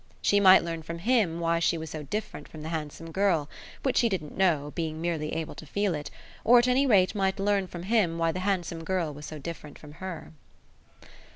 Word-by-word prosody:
She 205 - +3
might 190 -1 +7
learn 165 -1 -4
from 165 +2 -6
HIM 195 -4 +1
why 170 0 +1
she 170 0 +1
was 160 -1 -6
so 155 - -5
different 210 +10 -5
from 155 -1 -10
the 160 - -5
handsome 160 0 -5
girl 180 -6 +1 0.4
which 265 -3 +1
she 235 - +4
didn't 160 -7 -4
know, 155 -6 +1
being 160 -2 -3
merely 160 -2 -2
able 160 -1 -3
to - - -10
feel 200 +4 0
it; 150 -2 -5 0.3
or 245 +2 +7
at 240 +1 +4
any 265 +3 +3
rate 190 -6 +4
might 195 -2 0
learn 200 -1 +1
from 175 -1 -8
him 190 -5 +1
why 165 0 +1
the 185 - -4
handsome 180 -4 -2
girl 170 -3 -1
was 150 +1 -9
so 155 - -7
different 150 -1 -8
from 150 - -13
her. 185 -3 -6
170 Hz, 215 wpm, -28 LUFS, 160-195 Hz, 0.4 s, might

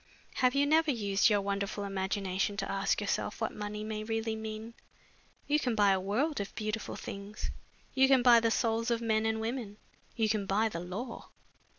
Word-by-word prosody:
Have 255 0 +3
you 280 +1 +4
never 315 +2 +3
used 205 -5 +2
your 205 -2 +3
wonderful 200 +1 -2
imagination 195 0 -1
to 195 - -2
ask 195 0 +1
yourself 205 +1 -2
what 220 - -2
money 210 0 -5
may 215 0 -4
really 225 0 -2
mean? 220 +1 -6 0.7
You 300 +1 +2
can 245 -5 0
buy 205 -2 +5
a 190 - +2
world 230 +11 0
of 200 - -7
beautiful 215 0 -3
things, 200 +2 -6 0.4
you 265 0 +5
can 265 -2 +5
buy 240 -2 +8
the 230 0 +2
souls 230 0 +1
of 235 -1 +1
men 220 -1 +1
and 220 0 0
women, 225 -2 -4 0.4
you 225 -2 +2
can 210 -2 0
buy 215 +3 +2
the 170 - -5
law." 200 +8 -6
215 Hz, 190 wpm, -31 LUFS, 200-230 Hz, 0.7 s, buy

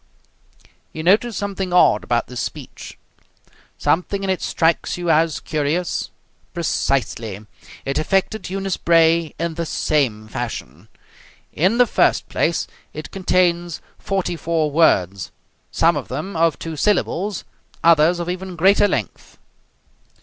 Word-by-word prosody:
You 155 - -5
notice 210 +5 +3
something 195 -2 -3
odd 175 -12 +4
about 120 -1 0
this 125 -1 -7
speech. - - -7 0.8
Something 195 +4 0
in 190 - 0
it 185 - -2
strikes 165 +1 0
you 175 -1 0
as 160 -2 +2
curious. 155 +4 -2 0.5
Precisely. 115 - -1 0.4
It 135 +2 -1
affected 195 +6 0
Eunice 195 0 -2
Bray 165 -1 +3
in 170 +1 -2
the 170 +1 -3
same 120 -11 0
fashion. 85 - -6 0.7
In 185 +9 +2
the 245 - +6
first - - +2
place, - - 0 0.3
it - - -7
contains 175 -3 +1 0.2
forty 190 -3 -2
four 160 -2 -1
words, 100 - +2 0.4
some 165 0 +2
of 145 - -4
them 155 +9 -5
of 165 0 +2
two 165 -1 -6
syllables, 200 +3 0 0.4
others 165 +1 +5
of 170 - -3
even 185 0 -4
greater 195 +4 +4
length. - - -4
170 Hz, 130 wpm, -20 LUFS, 150-185 Hz, 0.8 s, the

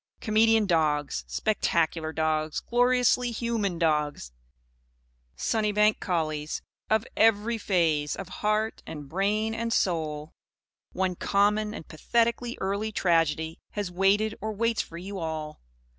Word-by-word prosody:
Comedian 220 0 +3
dogs, 155 -5 +1
spectacular 165 -6 0
dogs, 155 -1 0
gloriously 245 0 +2
human 225 -5 -1
dogs, 150 - 0 1.0
Sunnybank 210 -1 +2
collies 155 -4 -2 0.3
of 220 0 +2
every 225 +1 +3
phase 160 -7 +1
of 195 - -7
heart 215 +1 0
and 145 -2 -7
brain 210 +7 0
and 230 +1 -2
soul 155 -6 -1 0.6
one 185 0 0
common 210 +3 +1
and 160 - -9
pathetically 235 +7 0
early 200 +3 -2
tragedy 165 -4 +1
has 205 -4 -3
waited 200 +4 +2
or 220 - -2
waits 230 +2 +1
for 170 - -10
you 190 +3 -6
all! 155 -2 -5
195 Hz, 115 wpm, -27 LUFS, 160-220 Hz, 1.0 s, Comedian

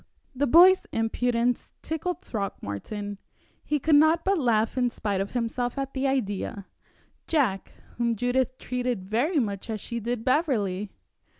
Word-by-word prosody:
The 280 +2 0
boy's 360 +7 +7
impudence 235 +2 0
tickled 350 +3 -3
Throckmorton. 205 - -5 0.4
He 300 - 0
could 310 +3 +1
not 315 +2 +4
but 390 -1 +2
laugh 225 -5 +2
in 250 -1 +2
spite 205 -4 -2
of 195 - -4
himself 245 +1 -2
at 275 0 -3
the 270 +1 0
idea 205 -6 -2 0.6
Jack, 250 -12 0 0.3
whom 235 -1 +1
Judith 250 +3 0
treated 245 -6 -3
very 255 - +1
much 205 -5 -1
as 220 -1 -2
she 235 +3 -5
did 235 0 -3
Beverley! 215 - +1
245 Hz, 140 wpm, -26 LUFS, 215-275 Hz, 0.6 s, boy's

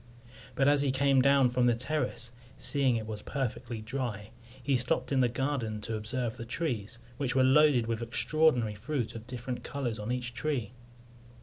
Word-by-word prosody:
But 135 +1 +3
as 145 0 +5
he 140 -2 +2
came 135 0 +3
down 135 -2 +4
from 125 0 +2
the 120 - +4
terrace, 130 -2 -2 0.3
seeing 135 -4 +2
it 110 -1 -2
was 110 -1 -6
perfectly 120 -4 -4
dry, 110 -3 -4 0.3
he 140 +1 +2
stopped 125 +3 0
in 135 - +2
the 125 -1 +4
garden 125 -4 -2
to 110 +2 -3
observe 115 +2 -3
the - - -6
trees, 120 -5 -3 0.2
which 130 -3 -1
were 130 - +5
loaded 135 -2 +5
with 115 0 -2
extraordinary 120 -1 +2
fruit 120 +3 -3
of 115 0 -9
different 125 0 -5
colours 120 -6 -3
on 105 +3 -3
each 125 -1 -3
tree. 135 -8 -2
125 Hz, 180 wpm, -30 LUFS, 115-140 Hz, 0.3 s, as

